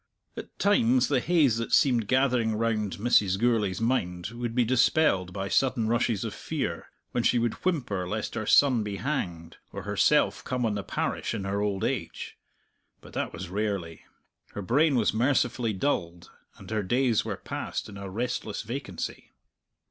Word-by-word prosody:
At - - -9
times 130 - +3
the 140 -3 +3
haze 150 -7 +3
that 115 - -3
seemed 120 -6 +4
gathering 125 -4 +2
round 110 -3 -1
Mrs. 100 -3 +3
Gourlay's 105 -4 +1
mind 90 -7 -1
would 120 0 -5
be 125 -2 +3
dispelled 125 - +2
by 95 +1 -4
sudden 125 +1 +1
rushes 115 -2 +1
of - - -4
fear, - - -4 0.2
when 120 - 0
she 120 - +3
would 115 -1 +1
whimper 120 - -1
lest 105 +1 -3
her 110 -2 -4
son 130 -5 +5
be 105 -1 -4
hanged, 95 - -4
or - - -7
herself - - +2
come 125 -1 -1
on 110 - 0
the 105 - -2
parish 100 - -2
in 100 - -4
her 100 +1 -1
old 100 -2 -1
age. - - -3 0.6
But - - -15
that - - -2
was - - -7
rarely. 100 -4 -3 0.5
Her 100 - -5
brain 140 - +3
was 115 -4 +2
mercifully 125 -1 +1
dulled, 90 -6 -2 0.3
and - - -12
her 110 -1 0
days 120 +3 +1
were - - -4
passed - - -5
in 100 - -10
a 100 -1 -7
restless 115 0 -3
vacancy. 115 -6 -6
115 Hz, 170 wpm, -27 LUFS, 100-125 Hz, 0.6 s, son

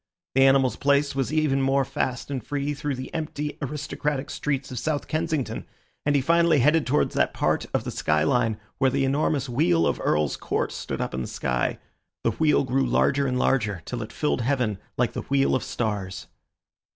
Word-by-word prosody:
The 135 - +4
animal's 135 -1 +3
pace 140 0 +2
was 135 0 -1
even 150 -3 +2
more 135 0 +2
fast 125 +2 -3
and 130 -5 -3
free 145 +2 -2
through 145 0 -3
the 130 +1 -7
empty, 150 -2 -4
aristocratic 145 0 -3
streets 140 -3 -2
of 125 - -3
South 150 +2 -2
Kensington, 155 -3 -2 0.4
and 145 - +3
he 140 - +2
finally 170 +1 +4
headed 150 +4 +3
towards 145 +3 +1
that - - +1
part - - 0
of - - 0
the - - -4
sky 75 0 +1
line 115 +5 +2 0.2
where 135 -1 +4
the 135 +1 +1
enormous 140 0 +1
Wheel 165 +7 +2
of - - 0
Earl's 75 -1 +1
Court - - -1
stood - - -4
up - - -3
in 65 - -2
the - - -4
sky. 60 -1 -1 0.5
The 115 - +2
wheel 150 +5 +3
grew 135 +1 +1
larger 140 0 +2
and 125 -1 0
larger, 110 -9 +1
till 125 -2 -4
it 110 +1 -6
filled 150 -2 0
heaven 120 -6 0 0.2
like - - +1
the - - -3
wheel 135 0 +1
of 130 - +1
stars. 100 -5 -3
135 Hz, 195 wpm, -25 LUFS, 125-145 Hz, 0.5 s, The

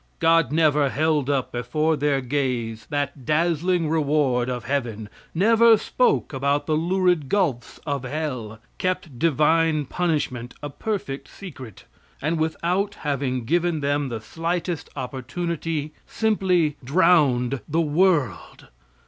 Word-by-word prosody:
God 165 -4 +3
never 150 -3 +3
held 150 -1 +1
up 135 -3 0
before 150 +7 0
their 145 -2 +1
gaze 125 -4 -2
that 145 -2 -3
dazzling 165 +3 +1
reward 145 -5 +1
of 125 -1 -3
heaven; 115 -6 -2 0.3
never 225 +4 +5
spoke 470 - +1
about 140 +2 0
the 155 - +1
lurid 175 -2 +1
gulfs 155 -13 -1
of 140 -3 -2
hell; 130 -6 -4 0.2
kept 185 -8 -2
divine 160 0 +2
punishment 140 -7 -2
a 145 - -4
perfect 145 -5 -4
secret, 130 - -11 0.3
and 160 +3 -1
without 180 +5 -1
having 135 -4 -1
given 170 +2 +1
them 145 -1 0
the 115 -2 -4
slightest 170 - -3
opportunity, 150 +4 -4
simply 180 -8 +1
drowned 140 -5 +3
the 160 +3 +2
world. 150 - 0
150 Hz, 120 wpm, -23 LUFS, 135-170 Hz, 0.3 s, never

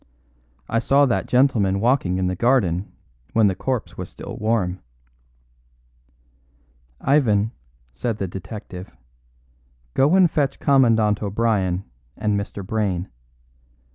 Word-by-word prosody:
I 115 - +1
saw 140 +4 +4
that 120 - 0
gentleman 115 -7 +2
walking 115 -5 +1
in 95 - 0
the 90 0 -1
garden 100 -6 +1 0.4
when 115 -1 +4
the 100 - +3
corpse 125 +5 -3
was - - -5
still - - -9
warm." 100 -5 0 2.2
"Ivan," 110 -7 +2 0.4
said 115 - -3
the 95 - -3
detective, 95 0 -8 1.0
"go 145 +7 +3
and 185 -4 +5
fetch 140 -3 0
Commandant 115 -7 +3
O'Brien 100 -3 0 0.3
and 105 -1 0
Mr. 100 -1 -4
Brayne. 95 -3 -1
110 Hz, 110 wpm, -22 LUFS, 95-125 Hz, 2.2 s, and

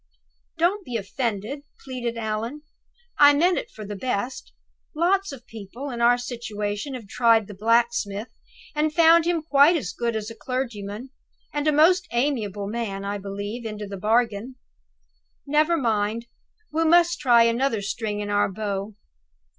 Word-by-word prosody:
"Don't 365 +5 +1
be 245 - -6
offended," 220 +4 -3 0.2
pleaded 245 -3 -4
Allan; 225 +6 -3 0.6
"I 290 0 +8
meant 350 +5 +3
it - - -8
for 215 - -10
the 205 +1 -6
best. 245 +3 -3 0.4
Lots 380 +4 +1
of 260 -4 -10
people 225 +6 -8
in 235 -1 -4
our 240 +1 +5
situation 230 0 -4
have 230 -5 -9
tried 230 0 +3
the 205 - -10
blacksmith, 225 0 0 0.4
and 305 0 +1
found 330 0 +6
him 340 -2 0
quite 295 +2 +5
as 180 - -4
good 235 -1 -2
as 215 0 -4
a - - -9
clergyman, 240 -2 -5 0.4
and 295 +1 -1
a - - +5
most 350 +5 +4
amiable 230 -6 -1
man, 200 -2 -4
I 200 +1 -3
believe, 200 +4 -5
into 215 -2 -5
the 200 0 -7
bargain. 220 +3 0 0.9
Never 305 +4 +2
mind! 225 -2 0 0.5
We 325 +1 +2
must 345 +1 +4
try 240 -4 +5
another 230 -1 +1
string 210 0 -3
to 205 - -3
our 205 -1 +2
bow." 200 0 -4
235 Hz, 155 wpm, -24 LUFS, 210-285 Hz, 0.9 s, I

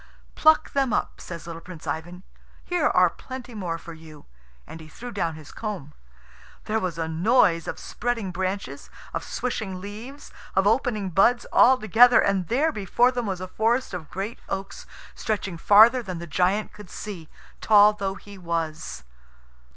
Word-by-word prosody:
"Pluck 315 0 +4
them 270 -5 +1
up," - - -2
says 170 -2 -8
little 165 -1 -8
Prince 175 -3 -11
Ivan. 175 +3 -5 0.4
"Here 355 -4 +1
are 180 0 +5
plenty 255 +6 -9
more 180 -6 -3
for 170 0 -10
you." 160 -2 -14 0.4
And 165 - -10
he 160 - -12
threw 240 +10 -9
down 170 -6 -2
his 155 -1 -12
comb. 195 -10 -6 0.7
There 220 +1 0
was 180 -5 -3
a 165 -1 -2
noise 170 0 +3
of - - -4
spreading 230 -5 -3
branches, 185 -6 -4 0.2
of - - -3
swishing 210 -7 -4
leaves, 220 +9 -9 0.2
of 195 +1 +3
opening 210 -3 +1
buds, 235 +7 +3
all 260 +1 +6
together, 240 +2 +6
and 195 -3 +1
there 295 +7 +2
before 235 +2 +2
them 245 -3 -3
was 185 -2 -3
a 185 - -5
forest 225 +5 0
of 165 -5 -6
great 200 +5 -5
oaks 195 0 -5 0.3
stretching 200 -5 -3
farther 220 +7 +6
than 185 -6 -6
the 170 - -6
giant 185 +6 0
could 210 -3 -12
see, 180 -7 -8 0.3
tall 210 -1 +6
though 195 -2 -3
he 200 -1 -13
was. 165 - -4
195 Hz, 165 wpm, -25 LUFS, 170-230 Hz, 0.7 s, all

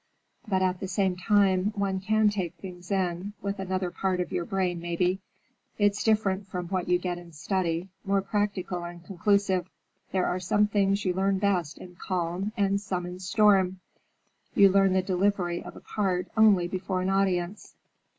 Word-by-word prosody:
But 190 -2 +1
at 185 -1 0
the 190 - -4
same 190 -1 0
time, 195 0 +2
one 195 -2 -1
can 215 +2 +2
take 185 -4 -3
things 180 -1 -10
in—with 195 +1 -2
another 185 -1 -2
part 185 -1 -1
of 180 - -2
your 170 - -1
brain, 185 -2 -1
maybe. 175 +2 0 0.6
It's 205 -1 +2
different 205 -3 +1
from 180 -2 -5
what 185 -2 -2
you 180 - +4
get 175 -1 -3
in 170 -1 -14
study, 170 +2 -1 0.2
more 195 -1 +1
practical 195 -3 -2
and 175 0 -9
conclusive. 195 -1 +1 0.4
There 185 -1 +1
are 180 - -1
some 205 +3 +2
things 200 -1 +1
you 180 - +2
learn 195 +1 +1
best 185 -6 0
in 180 -1 -12
calm, 180 +3 -2
and 200 -1 +1
some 185 -3 -3
in 180 +1 -7
storm. 190 -1 +3 0.8
You 200 -1 +7
learn 195 0 +4
the 190 0 +2
delivery 185 -2 0
of - - -10
a - - -11
part 185 -4 -1
only 210 -5 +5
before 185 0 -2
an 185 - 0
audience." 190 0 -1
190 Hz, 170 wpm, -27 LUFS, 180-200 Hz, 0.8 s, You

